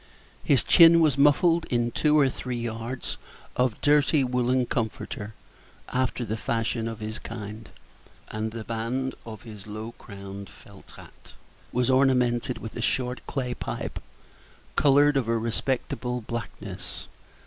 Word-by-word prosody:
His -, -, +3 dB
chin 170 Hz, -1 st, +8 dB
was 155 Hz, -5 st, +4 dB
muffled 165 Hz, +4 st, +4 dB
in 120 Hz, -1 st, 0 dB
two 150 Hz, +3 st, +3 dB
or 140 Hz, -2 st, +5 dB
three 125 Hz, -1 st, -4 dB
yards 115 Hz, +2 st, -4 dB, 0.4 s
of 125 Hz, -3 st, +1 dB
dirty 145 Hz, 0 st, +4 dB
woollen 125 Hz, 0 st, +1 dB
comforter, 110 Hz, -2 st, -3 dB, 0.5 s
after 125 Hz, -1 st, 0 dB
the 110 Hz, -, -2 dB
fashion 115 Hz, 0 st, -1 dB
of 115 Hz, -1 st, -6 dB
his 110 Hz, 0 st, -4 dB
kind; 110 Hz, -1 st, -7 dB, 0.6 s
and 110 Hz, +1 st, -2 dB
the 115 Hz, 0 st, -6 dB
band 115 Hz, +4 st, -2 dB
of 110 Hz, -2 st, -8 dB
his 105 Hz, -3 st, -10 dB
low 110 Hz, +2 st, -6 dB
crowned 100 Hz, -1 st, -9 dB
felt -, -, -16 dB
hat -, -, -15 dB, 0.4 s
was 125 Hz, +1 st, +2 dB
ornamented 125 Hz, -2 st, +3 dB
with 110 Hz, -1 st, -8 dB
a 120 Hz, -, -3 dB
short 125 Hz, +1 st, 0 dB
clay 125 Hz, -3 st, -2 dB
pipe, -, -, -5 dB, 0.7 s
colored 145 Hz, 0 st, +5 dB
of 125 Hz, -4 st, 0 dB
a 115 Hz, 0 st, +2 dB
respectable 125 Hz, +2 st, -1 dB
blackness. 115 Hz, +1 st, -6 dB
120 Hz, 135 wpm, -26 LUFS, 110-130 Hz, 0.7 s, chin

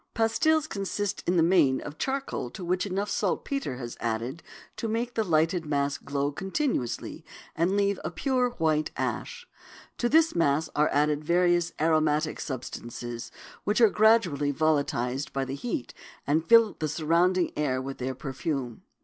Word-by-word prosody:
Pastils 310 Hz, +8 st, +2 dB
consist 200 Hz, -3 st, -3 dB
in 180 Hz, +1 st, +2 dB
the 165 Hz, -, +5 dB
main 165 Hz, -7 st, +4 dB
of 145 Hz, +1 st, -9 dB
charcoal 270 Hz, -, -2 dB
to 180 Hz, +8 st, -8 dB
which 185 Hz, +3 st, 0 dB
enough 200 Hz, +2 st, -2 dB
saltpetre 210 Hz, -, -1 dB
is 120 Hz, -2 st, -6 dB
added 120 Hz, +7 st, -3 dB, 0.4 s
to 230 Hz, -, -2 dB
make 235 Hz, +2 st, -2 dB
the 225 Hz, -, +1 dB
lighted 165 Hz, -1 st, +2 dB
mass 145 Hz, -2 st, -1 dB
glow 140 Hz, +1 st, -2 dB
continuously 190 Hz, -, -2 dB, 0.3 s
and 175 Hz, +5 st, +1 dB
leave 200 Hz, -1 st, +1 dB
a -, -, -2 dB
pure 255 Hz, -3 st, 0 dB
white 155 Hz, -8 st, 0 dB
ash. 485 Hz, 0 st, -3 dB, 0.5 s
To 240 Hz, -, +1 dB
this 320 Hz, +3 st, +4 dB
mass 155 Hz, -2 st, +1 dB
are 150 Hz, +1 st, +3 dB
added 150 Hz, +1 st, +1 dB
various 175 Hz, +1 st, +2 dB
aromatic 155 Hz, -1 st, +1 dB
substances 120 Hz, -3 st, -6 dB, 0.3 s
which 210 Hz, +3 st, +1 dB
are 225 Hz, -4 st, +6 dB
gradually 210 Hz, -10 st, +3 dB
volatilized 140 Hz, -3 st, 0 dB
by 135 Hz, -1 st, -1 dB
the 130 Hz, -, -5 dB
heat 140 Hz, -, -4 dB, 0.3 s
and 155 Hz, +3 st, 0 dB
fill 230 Hz, -2 st, +6 dB
the 155 Hz, -, 0 dB
surrounding 170 Hz, +4 st, +2 dB
air 135 Hz, -4 st, 0 dB
with 135 Hz, +1 st, -6 dB
their 130 Hz, +1 st, -3 dB
perfume. 135 Hz, -2 st, -4 dB
160 Hz, 155 wpm, -27 LUFS, 140-205 Hz, 0.5 s, are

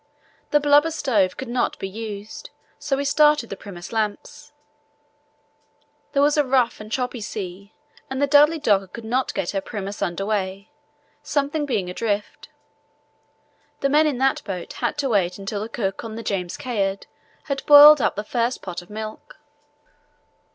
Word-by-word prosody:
The 295 Hz, -, +4 dB
blubber 290 Hz, +2 st, +4 dB
stove 230 Hz, -, 0 dB
could 260 Hz, -, -6 dB
not 240 Hz, +1 st, -1 dB
be 195 Hz, -, -4 dB
used, 210 Hz, 0 st, -8 dB, 0.3 s
so 280 Hz, -2 st, -1 dB
we 280 Hz, -, -2 dB
started 295 Hz, -3 st, +3 dB
the -, -, -3 dB
Primus 180 Hz, -3 st, -10 dB
lamps. 215 Hz, -2 st, -4 dB, 1.6 s
There 280 Hz, -1 st, +3 dB
was 295 Hz, +1 st, +3 dB
a 295 Hz, -, +4 dB
rough, 255 Hz, -4 st, +1 dB
choppy 250 Hz, 0 st, -3 dB
sea, 200 Hz, -1 st, -7 dB, 0.3 s
and 265 Hz, -, -4 dB
the 285 Hz, -, +3 dB
Dudley 295 Hz, +3 st, +5 dB
Docker 205 Hz, -10 st, +2 dB
could 230 Hz, +5 st, -10 dB
not 255 Hz, +4 st, 0 dB
get 170 Hz, -, -2 dB
her 195 Hz, -, -2 dB
Primus 200 Hz, -1 st, -6 dB
under 175 Hz, +2 st, -2 dB
way, 200 Hz, -1 st, -3 dB, 0.5 s
something 290 Hz, +1 st, -1 dB
being 215 Hz, -9 st, -1 dB
adrift. 205 Hz, +2 st, -3 dB, 1.3 s
The 275 Hz, -, +2 dB
men 305 Hz, +2 st, +4 dB
in 285 Hz, -4 st, -1 dB
that 270 Hz, +1 st, +1 dB
boat 185 Hz, -4 st, -6 dB
had -, -, -2 dB
to 280 Hz, -2 st, -1 dB
wait 185 Hz, -5 st, +1 dB
until 200 Hz, +1 st, -4 dB
the 220 Hz, -, -5 dB
cook 195 Hz, -3 st, -3 dB
on 220 Hz, -1 st, -7 dB
the 230 Hz, -, -6 dB
James 180 Hz, -5 st, -3 dB
Caird 200 Hz, -6 st, -2 dB, 0.4 s
had 275 Hz, -3 st, -4 dB
boiled 295 Hz, 0 st, +10 dB
up -, -, +1 dB
the 210 Hz, -, -3 dB
first 235 Hz, +3 st, -2 dB
pot 180 Hz, -2 st, -5 dB
of 175 Hz, -, -18 dB
milk. 215 Hz, +1 st, -8 dB
225 Hz, 165 wpm, -23 LUFS, 200-280 Hz, 1.6 s, boiled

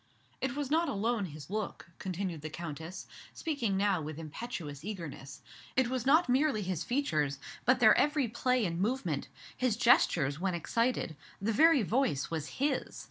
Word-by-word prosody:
"It 265 Hz, -1 st, -1 dB
was 290 Hz, -2 st, -3 dB
not 330 Hz, +1 st, +3 dB
alone 225 Hz, -2 st, 0 dB
his 155 Hz, 0 st, -9 dB
look," 210 Hz, -5 st, -4 dB
continued 185 Hz, -3 st, -3 dB
the 155 Hz, -, -5 dB
Countess, 160 Hz, +2 st, -6 dB, 0.3 s
speaking 255 Hz, -, -1 dB
now 195 Hz, -3 st, +2 dB
with 155 Hz, 0 st, -6 dB
impetuous 160 Hz, -, -6 dB
eagerness, 150 Hz, -8 st, -7 dB, 0.3 s
"it 260 Hz, -2 st, +3 dB
was 255 Hz, -1 st, -2 dB
not 315 Hz, +5 st, +5 dB
merely 255 Hz, -3 st, +2 dB
his 180 Hz, -3 st, -2 dB
features, 155 Hz, -, 0 dB, 0.3 s
but 255 Hz, +1 st, +4 dB
their 220 Hz, -3 st, +7 dB
every 295 Hz, -3 st, +2 dB
play 245 Hz, +1 st, +1 dB
and 170 Hz, -1 st, -2 dB
movement; 200 Hz, -, -1 dB, 0.3 s
his 250 Hz, -4 st, 0 dB
gestures 155 Hz, -, +4 dB
when 185 Hz, -1 st, 0 dB
excited; 230 Hz, -1 st, 0 dB, 0.2 s
the 220 Hz, +3 st, 0 dB
very 310 Hz, 0 st, +6 dB
voice 225 Hz, -, 0 dB
was 155 Hz, -2 st, -2 dB
his. 280 Hz, +1 st, -1 dB
205 Hz, 160 wpm, -31 LUFS, 165-255 Hz, 0.3 s, their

